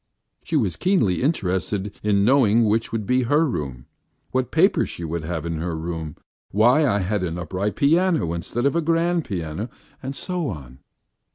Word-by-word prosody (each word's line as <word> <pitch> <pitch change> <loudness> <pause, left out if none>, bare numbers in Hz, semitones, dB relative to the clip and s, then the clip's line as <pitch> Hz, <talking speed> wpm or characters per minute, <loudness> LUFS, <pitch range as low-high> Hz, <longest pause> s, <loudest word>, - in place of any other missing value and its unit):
She - - -4
was - - +1
keenly 180 - +2
interested 100 - -1
in 100 -1 +2
knowing 120 -3 +4
which 110 +2 +1
would 110 -2 -2
be 125 +4 +2
her 145 +6 +3
room, 70 - -4 0.5
what 130 -1 0
paper 180 +6 +3
she 85 - -6
would 85 0 -3
have 80 0 -4
in 85 -1 -3
the 85 - -3
room, 80 -1 -5 0.3
why 125 +9 +4
I 100 -4 +1
had 100 +2 -1
an 85 -2 -3
upright 95 +4 -3
piano 160 - +2
instead 110 +9 -3
of 140 - +2
a 170 - +2
grand 165 +1 +1
piano, 90 +4 -4 0.3
and 135 +1 -5
so 180 -4 -3
on. 65 -6 -8
105 Hz, 175 wpm, -23 LUFS, 85-140 Hz, 0.5 s, knowing